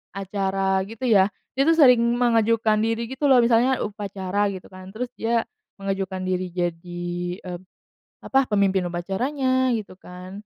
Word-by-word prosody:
acara 195 Hz, -1 st, -1 dB
gitu 225 Hz, +3 st, -10 dB
ya, 205 Hz, -4 st, +4 dB, 0.2 s
dia 270 Hz, +2 st, +2 dB
tuh 330 Hz, -, +5 dB
sering 250 Hz, -6 st, +7 dB, 0.2 s
mengajukan 230 Hz, -2 st, +2 dB
diri 230 Hz, +1 st, -1 dB
gitu 265 Hz, +2 st, -3 dB
loh. 260 Hz, -, +7 dB
Misalnya 240 Hz, +2 st, +3 dB
upacara 200 Hz, -1 st, -2 dB
gitu 190 Hz, -2 st, -7 dB
kan, 185 Hz, 0 st, -11 dB
terus 240 Hz, +4 st, -5 dB
dia 230 Hz, 0 st, 0 dB, 0.3 s
mengajukan 195 Hz, -1 st, -3 dB
diri 185 Hz, 0 st, -2 dB
jadi, 175 Hz, 0 st, -4 dB, 0.3 s
eee, 180 Hz, -1 st, -6 dB, 0.6 s
apa, 270 Hz, 0 st, +2 dB
pemimpin 195 Hz, -2 st, +2 dB
upacaranya 255 Hz, +9 st, 0 dB
gitu 205 Hz, -4 st, -6 dB
kan. 180 Hz, 0 st, -11 dB
200 Hz, 145 wpm, -23 LUFS, 185-235 Hz, 0.6 s, sering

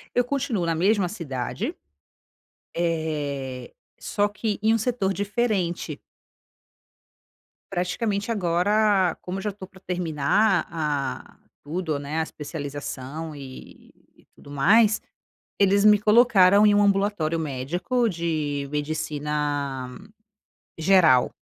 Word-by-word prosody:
E -, -, +4 dB
eu 245 Hz, -, +4 dB
continuo 255 Hz, -6 st, -2 dB
na 165 Hz, -1 st, 0 dB
mesma 190 Hz, +2 st, +2 dB
cidade. 135 Hz, -, -4 dB, 1.0 s
Eh, 150 Hz, -6 st, -3 dB, 0.3 s
só 205 Hz, 0 st, 0 dB
que 210 Hz, 0 st, -3 dB
em 220 Hz, +1 st, +3 dB
um -, -, +3 dB
setor 220 Hz, -4 st, -1 dB
diferente. 200 Hz, -3 st, -1 dB, 1.7 s
Praticamente 200 Hz, +4 st, -1 dB
agora, 195 Hz, 0 st, +2 dB
como 185 Hz, +2 st, -5 dB
eu -, -, -6 dB
já 210 Hz, -, -1 dB
tô 195 Hz, -1 st, -10 dB
pra 190 Hz, -1 st, -18 dB
terminar 180 Hz, +3 st, +1 dB
a 150 Hz, -5 st, -3 dB, 0.3 s
tudo, 160 Hz, 0 st, -3 dB
né, 145 Hz, +3 st, -3 dB
a 160 Hz, -, +2 dB
especialização 145 Hz, 0 st, -6 dB
e 135 Hz, -2 st, -12 dB, 0.2 s
e -, -, -25 dB
tudo 145 Hz, -, -14 dB
mais, 215 Hz, +10 st, +4 dB, 0.6 s
eles 200 Hz, 0 st, +4 dB
me 210 Hz, 0 st, +7 dB
colocaram 210 Hz, -3 st, +5 dB
em 205 Hz, -, +4 dB
um 205 Hz, -, +4 dB
ambulatório 195 Hz, -5 st, +1 dB
médico, 160 Hz, -, -1 dB
de 155 Hz, -5 st, -2 dB
medicina 145 Hz, -3 st, -2 dB, 0.9 s
geral. 160 Hz, -7 st, +5 dB
175 Hz, 110 wpm, -24 LUFS, 150-205 Hz, 1.7 s, me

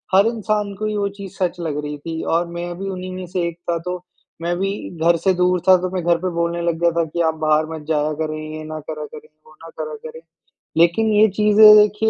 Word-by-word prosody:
हर 200 Hz, +3 st, +6 dB
इंसान 215 Hz, -3 st, -1 dB
को 215 Hz, -, -2 dB
ही 215 Hz, 0 st, -1 dB
वो 200 Hz, -1 st, 0 dB
चीज़ 195 Hz, -2 st, -8 dB
सच 180 Hz, -2 st, -1 dB
लग 155 Hz, -4 st, -3 dB
रही 150 Hz, 0 st, -5 dB
थी 160 Hz, +1 st, -5 dB
और 170 Hz, +1 st, +1 dB
मैं 175 Hz, 0 st, -5 dB
भी 195 Hz, 0 st, -4 dB
उन्हीं 185 Hz, -1 st, -5 dB
में 185 Hz, -, -6 dB
से 175 Hz, -1 st, -1 dB
एक 170 Hz, -1 st, -6 dB
था। 170 Hz, -, +1 dB
तो 180 Hz, 0 st, -2 dB, 0.4 s
मैं 170 Hz, +1 st, -1 dB
भी 195 Hz, 0 st, 0 dB, 0.3 s
घर 170 Hz, 0 st, +4 dB
से 190 Hz, +3 st, +2 dB
दूर 180 Hz, 0 st, +2 dB
था, 185 Hz, -, +9 dB
तो 185 Hz, +1 st, -3 dB
मैं 180 Hz, -2 st, -2 dB
घर 170 Hz, 0 st, +3 dB
पे 185 Hz, +2 st, -2 dB
बोलने 170 Hz, 0 st, -1 dB
लग 170 Hz, -1 st, -1 dB
गया 170 Hz, -, +4 dB
था 170 Hz, 0 st, +1 dB
कि 170 Hz, +2 st, -3 dB
आप 160 Hz, -, -3 dB
बाहर 155 Hz, 0 st, +3 dB
मत 150 Hz, -1 st, -9 dB
जाया 150 Hz, -1 st, +1 dB
करें, 155 Hz, 0 st, -2 dB, 0.2 s
ये 155 Hz, -, -7 dB
ना 155 Hz, 0 st, -6 dB
करा 155 Hz, 0 st, -6 dB
करें, 150 Hz, 0 st, -12 dB, 0.2 s
वो 155 Hz, -, -18 dB
ना 165 Hz, -, -10 dB
करा 155 Hz, -1 st, -4 dB
करें। 160 Hz, +1 st, -8 dB, 0.6 s
लेकिन 170 Hz, +7 st, +3 dB
ये 215 Hz, +1 st, +6 dB
चीज़ें 210 Hz, 0 st, +8 dB
देखिए 210 Hz, +1 st, +3 dB
170 Hz, 255 wpm, -20 LUFS, 160-195 Hz, 0.6 s, था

